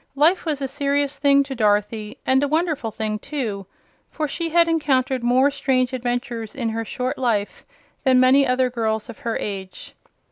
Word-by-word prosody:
Life 325 +5 +3
was 290 -3 -1
a - - 0
serious 280 +1 -1
thing 280 0 +4
to 275 -1 -6
Dorothy, 210 -1 0
and 265 +1 +3
a 285 - +1
wonderful 310 -5 0
thing, 215 -1 -3
too, 220 -9 -4 0.4
for 310 -1 -3
she 330 +3 -3
had 340 +1 +4
encountered 270 -5 +1
more 255 +4 +3
strange 265 -2 0
adventures 245 -2 -3
in 235 -4 -2
her 225 +1 -3
short 255 +3 -3
life 220 -5 -1 0.4
than 260 -2 +4
many 265 +2 +5
other 255 0 +1
girls 220 -2 -2
of 235 - -9
her 230 -1 -2
age. 190 -2 -6
255 Hz, 175 wpm, -22 LUFS, 225-280 Hz, 0.4 s, many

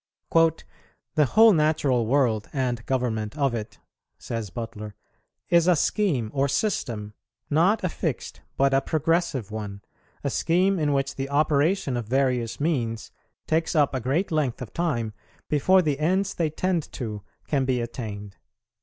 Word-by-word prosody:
"The 160 -2 0
whole 220 - +6
natural 150 -7 +2
world 120 -5 +1
and 125 -4 -1
government 120 -2 -1
of 140 -4 +1
it," 110 -2 -5 0.4
says 115 -4 -5
Butler, 105 0 -7 0.5
"is 170 -1 +4
a 180 - +6
scheme 145 - 0
or 140 0 +2
system; 115 - -2 0.4
not 180 +9 +3
a 180 - +1
fixed, - - -4 0.2
but 135 0 +3
a 135 - +4
progressive 160 - 0
one; 105 -2 -6 0.4
a - - -1
scheme 185 +3 +2
in 150 -2 +1
which 135 0 -1
the 135 0 -3
operation 150 +1 +2
of 115 -3 -4
various 125 -2 0
means 120 -8 -1 0.3
takes 160 +2 0
up 145 -3 +3
a 130 - 0
great 140 - -1
length 150 -6 0
of 125 -5 -8
time 130 -11 -1 0.3
before 185 +6 +4
the 145 -3 0
ends 185 +5 +1
they 165 -2 0
tend 175 +1 -1
to 110 -5 -5 0.3
can 140 -3 +1
be 130 -1 +1
attained. 105 -4 -6
140 Hz, 150 wpm, -25 LUFS, 115-165 Hz, 0.5 s, whole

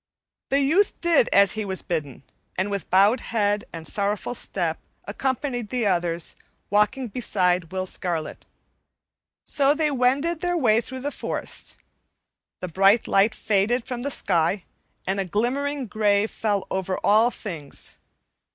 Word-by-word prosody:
The 275 +1 +3
youth 340 +9 +2
did 335 -8 +3
as 200 -1 +6
he 215 - -3
was 190 -2 -3
bidden 145 -6 -4 0.3
and, 190 +2 -1
with 200 -1 -4
bowed 200 +6 +5
head 210 -1 0
and 165 -1 -8
sorrowful 205 +6 -1
step, 175 -8 -2 0.3
accompanied 245 +1 -2
the 250 -3 -1
others, 175 -3 0 0.4
walking 210 +5 +2
beside 180 -7 0
Will 185 0 -2
Scarlet. 175 -4 -4 1.0
So 280 +1 +2
they 305 -1 +1
wended 280 +6 +1
their 355 -1 0
way 225 -7 +3
through 260 +2 -7
the 290 +2 -2
forest. - - -3 0.9
The 180 - -3
bright 195 +6 +3
light 200 +3 +3
faded 220 +4 +1
from 250 -2 -5
the 280 - -2
sky 180 - +1 0.4
and 190 +2 -1
a 195 - 0
glimmering 265 - -1
gray 205 -1 +2
fell 210 -3 -2
over 190 0 -1
all 220 +3 +5
things. 165 - -7
210 Hz, 140 wpm, -24 LUFS, 190-255 Hz, 1.0 s, as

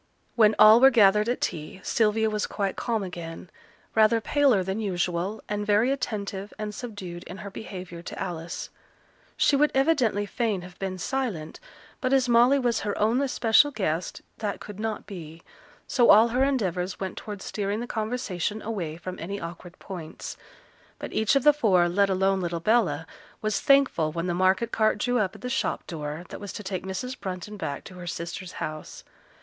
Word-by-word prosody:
When 215 -2 +5
all 215 +2 +9
were 265 +2 +8
gathered 210 -2 +5
at 245 - -1
tea, 155 +4 -3
Sylvia 220 0 +2
was 210 -1 -1
quite 200 -2 -2
calm 225 -4 -1
again; 170 -1 -7 0.4
rather 220 +1 +4
paler 255 -4 +3
than 190 +3 -3
usual, 185 0 -2
and 210 0 -2
very 210 +5 +3
attentive 205 -6 -3
and 210 -1 -4
subduced 195 -7 -7
in 185 - -8
her 200 0 -8
behaviour 185 -4 -8
to - - -8
Alice; 170 -3 -5 0.7
she 285 - +4
would 295 +2 +4
evidently 265 -8 +2
fain 210 -3 -1
have 180 0 -12
been 190 -1 -3
silent, 190 -7 -3 0.4
but 255 0 0
as 265 -2 +3
Molly 240 +3 +5
was 245 -3 +1
her 205 -1 -3
own 225 +5 +2
especial 270 +1 +4
guest, 180 - -2 0.2
that 210 -3 -3
could 210 -1 -9
not 220 -1 -3
be, 165 -4 -9 0.4
so 245 -3 +3
all 220 +3 +8
her 250 +3 +2
endeavours 190 -9 -1
went 190 -1 -4
towards 205 -2 -7
steering 205 0 -2
the 240 - -3
conversation 215 -4 -2
away 180 -8 -4
from 185 +1 -7
any 200 +4 -4
awkward 170 +1 -8
points. 170 -5 -8 0.6
But - - -7
each 220 +4 +2
of 275 - +3
the 295 - +7
four, 195 -11 +3
let 195 +3 +2
alone 190 0 +2
little 170 -1 -2
Bella, 170 -6 +2 0.4
was 215 -1 0
thankful 275 - +3
when 170 +2 -3
the 175 - 0
market 185 +6 +2
cart 215 -1 +2
drew 245 +3 +1
up 195 -3 -1
at - - -13
the 250 - -4
shop 260 +1 -1
door, 155 +1 -5
that - - -7
was 205 - -6
to 210 - -7
take 190 -1 -4
Mrs. 250 +7 -4
Brunton 190 +2 -5
back 145 -8 -4
to - - -11
her 175 - -8
sister's 170 +2 -5
house. 155 0 -6
205 Hz, 185 wpm, -26 LUFS, 180-230 Hz, 0.7 s, all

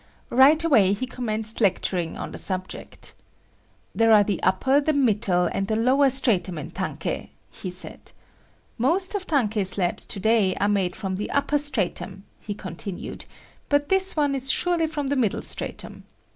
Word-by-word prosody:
Right 285 +6 +6
away 220 - +4
he 210 +6 -3
commenced 225 -3 -3
lecturing 180 -4 0
on - - -6
the - - -6
subject. 185 -1 -4 0.8
"There 225 0 +3
are 210 -1 +7
the 200 -2 -2
upper, 260 +10 +2
the 310 +2 +1
middle 210 -9 +2
and 195 - -2
the 220 - 0
lower 260 +5 +3
stratum 220 -9 +1
in 150 - -7
tankei," - - -4 0.2
he 185 - -7
said. 180 +1 -5 0.7
"Most 350 - +1
of 390 -2 -4
tankei 225 -9 +1
slabs 185 -1 -1
to - - -3
day 210 -2 +2
are 205 - 0
made 195 -4 0
from 190 -1 -4
the 205 - -4
upper 290 +1 +1
stratum," 200 -8 -2 0.2
he 205 - -6
continued, 185 -1 -7 0.4
"but 285 0 +1
this 385 0 +2
one 290 -2 +1
is 270 -1 +2
surely 345 -2 +1
from 305 -2 -4
the 280 +1 0
middle 235 -7 0
stratum. - - -6
220 Hz, 165 wpm, -24 LUFS, 195-280 Hz, 0.8 s, are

